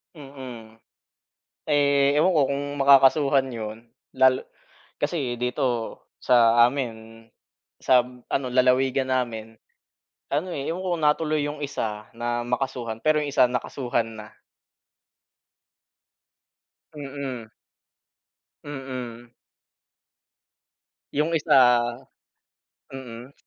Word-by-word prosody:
Mm. 130 -6 -10 0.9
Eh, 140 -1 +3
ewan 185 +4 +3
ko - - +5
kung 140 0 -2
makakasuhan 140 0 +5
'yon, 110 -3 -6 0.4
lalo 130 0 +4 0.6
kasi 145 -5 -1
dito 125 -1 -2 0.2
sa 120 -1 +5
amin, 115 -4 -6 0.6
sam 125 -1 +2
ano, 135 -2 0
lalawigan 130 +1 +2
namin, 115 -3 -3 0.8
ano, 160 +6 -1
eh, 140 +2 -3
yung 180 - -6
una, 170 -5 +2
tuloy 155 -1 -1
yung 145 0 -5
isa 110 -6 -4
na 120 0 -2
makasuhan, 125 -3 -3
pero 155 0 +4
yung 150 - -3
isa 135 - +4
nakasuhan 120 -2 -2
na. 105 - -9 2.7
Mm. 135 -5 -6 1.1
Mm. 125 -4 -7 1.8
Yung 155 +3 0
isa 125 -5 +5 1.1
mm. 125 -1 -9
130 Hz, 90 wpm, -24 LUFS, 120-140 Hz, 2.7 s, ko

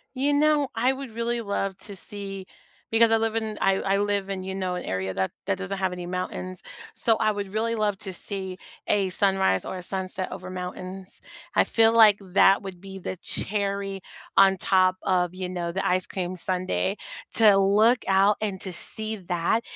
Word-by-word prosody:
You 275 +3 +1
know, 295 -1 +3
I 245 +4 +2
would 265 -2 -8
really 235 +1 -2
love 200 -2 -2
to 205 - -8
see 195 -1 -6 0.5
because 225 0 +4
I 225 - +5
live 225 0 -1
in 220 -2 -2
I 195 0 +2
I 195 0 +1
live 200 -1 -1
in, 190 -1 -4
you 190 0 -5
know, 185 -1 -2
an 180 - -5
area 95 0 -3
that 95 0 -1 0.2
that 195 -2 0
doesn't 195 +1 -4
have 190 -1 0
any 180 -1 -6
mountains, 185 0 -5 0.3
so 225 -2 +2
I 215 -1 +2
would 205 -2 -5
really 225 +2 -1
love 210 -3 0
to 190 -2 -5
see 190 -1 -1 0.3
a 200 -2 +1
sunrise 190 - +3
or - - -5
a - - -6
sunset 185 0 0
over 185 0 -7
mountains, 185 +1 -7 0.4
I - - +5
feel 225 -1 +3
like 215 -3 +6
that 195 +1 +4
would 190 -3 -8
be 195 +1 -9
the 185 - -5
cherry 200 -1 -3 0.4
on 195 0 +6
top 185 0 +3
of, 180 -2 0
you 185 -1 -5
know, 175 -2 -3
the 190 +3 -3
ice 185 +1 +2
cream 185 -1 -4
sundae 185 +1 0 0.4
to 210 -3 +6
look 210 +5 +3
out 195 +2 +4
and 200 -3 -3
to 190 - -3
see 215 +5 +1
that, 180 +2 -1
195 Hz, 195 wpm, -25 LUFS, 185-215 Hz, 0.5 s, like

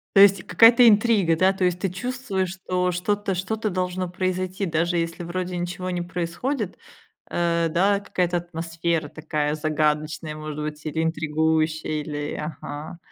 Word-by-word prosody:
То 195 - +7
есть 200 0 +8
и - - -17
какая-то 235 +1 +7
интрига, 205 -6 +3
да? 190 +2 +4
То 190 - -3
есть 180 -1 +1
ты 195 0 -1
чувствуешь, 205 -3 -3
что 180 -1 -1
что-то 200 +3 -1
что-то 215 +4 -2
должно 180 0 -2
произойти, 185 +1 -2
даже 170 +1 0
если 165 +1 -2
вроде 180 +1 -3
ничего 180 +1 -3
не 180 -1 -2
происходит, 180 +7 -3 0.5
э, 170 -1 +1
да? 195 +4 +3
Какая-то 180 -3 -1
атмосфера 165 -2 -2
такая 150 -1 -2
загадочная, 155 0 -1
может 155 -1 -6
быть. 150 0 -6
Или 160 +1 -1
интригующая, 160 0 0
или 145 -1 -4
ага. 150 +1 -6
175 Hz, 150 wpm, -24 LUFS, 160-190 Hz, 0.5 s, есть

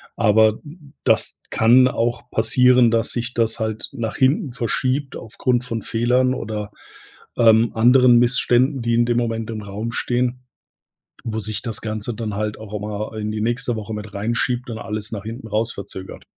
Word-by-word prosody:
Aber 110 -1 +4
d - - -13 0.2
d 145 -3 -19
das - - +2
kann 125 +3 +5
auch 120 0 -2
passieren, 125 +1 +4
dass 115 0 +1
sich 120 0 -3
das 115 0 0
halt 110 0 -3
nach 115 -4 -4
hinten 140 - +2
verschiebt 130 +3 -2
aufgrund 120 +2 -1
von 115 -3 -4
Fehlern 125 +4 +1
oder, 105 -1 -5 0.7
ähm, 115 0 +5
anderen 120 +1 +5
Missständen, 125 +2 +2
die 115 0 0
in 120 0 +3
dem 120 0 0
Moment 115 -1 -2
im 110 -1 -5
Raum 105 +3 -5
stehen, 125 +1 -1 0.8
wo 110 -1 -3
sich 110 0 -3
das 115 -3 -4
Ganze 110 +1 -4
dann 110 -2 -5
halt 105 0 -3
auch 110 -1 -10
immer, 105 +1 -4
äh, - - -4
in 105 0 -3
die 105 0 -3
nächste 120 +1 -1
Woche 110 0 -6
mit 105 -1 -7
reinschiebt 120 +4 -1
und 115 - -5
alles 110 -1 -5
nach 105 -2 -5
hinten 115 +1 -7
raus 110 +2 0
verzögert. 95 -1 -8
115 Hz, 180 wpm, -21 LUFS, 110-125 Hz, 0.8 s, kann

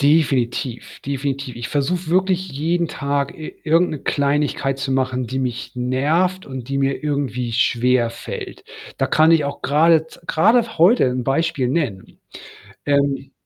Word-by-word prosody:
Definitiv, 135 -5 0
definitiv. 140 -2 -3
Ich 120 - -5
versuche 160 +5 -1
wirklich 185 +1 +1
jeden 165 +4 -1
Tag 140 -1 -2
i 155 - -7
irgend 165 +3 +3
'ne 155 - -4
Kleinigkeit 140 -1 0
zu 135 - -3
machen, 130 -2 0
die 130 +3 -3
mich 125 -1 -3
nervt 150 +10 0
und 130 -2 -7
die 140 0 -1
mir 135 +2 0
irgendwie 135 -5 -2
schwerfällt. 120 0 -1 0.3
Da - - 0
kann 155 +1 +4
ich 160 -3 +4
auch 140 0 -5
grade 160 +2 +3
z - - -17
grade 225 +4 +2
heute 195 +9 +5
'n 125 -1 -3
Beispiel 140 -2 0
nennen. 125 - -3 0.7
Ähm 140 -1 0
140 Hz, 145 wpm, -20 LUFS, 130-160 Hz, 0.7 s, heute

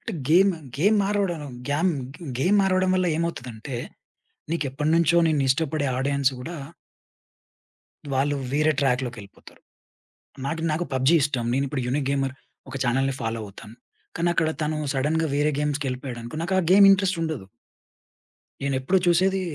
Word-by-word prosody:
అంటే - - -6 0.2
game, 190 +4 +5 0.2
game 205 +9 +3
మారవడానూ 195 -7 -1 0.2
game 160 +6 +2 0.3
గే 170 - -10
game 185 +10 +3
మారవడం 185 -1 +2
వల్ల 185 -1 +1
ఏమవుతుదంటే, 130 -7 -4 0.8
నీకెప్పటినుంచో 160 +2 +1
నిన్నిష్టపడే 145 +1 +1
audience 140 0 +1
గూడా 165 +5 -6 1.6
వాళ్ళు 145 +2 +1 0.2
వేరే 155 +2 +3
ట్రాక్‌లోకెళ్ళిపోతారు. 125 -6 -3 0.9
నాకు, 160 +2 -3
నాకు 165 +3 -1
పబ్‌జీ 130 +5 +3
ఇష్టం. 130 -5 0
నేనిప్పుడు 135 -1 -1
యూనిక్ 135 +2 -1
గేమర్ 135 -1 -1 0.3
ఒక - - -6
ఛానెల్‌ని 135 +2 +1
ఫాలో 115 0 -2
అవుతాను. 105 +3 -12 0.4
కానక్కడ 170 -2 +1
తను 155 +1 -1 0.2
సడెన్‌గా 155 +4 0
వేరే 145 +1 +2
గేమ్స్‌ 150 0 -1
కెళ్ళిపోయాడనుకో, 125 0 -5
నాకా 190 +2 0 0.2
గేమ్ 200 0 +8
ఇంట్రెస్ట్ 190 -2 +2
ఉండదు. 155 -12 -3 1.2
నేనెప్పుడూ 140 +7 +1
చూసేదీ 190 +2 +3
150 Hz, 125 wpm, -24 LUFS, 130-170 Hz, 1.6 s, గేమ్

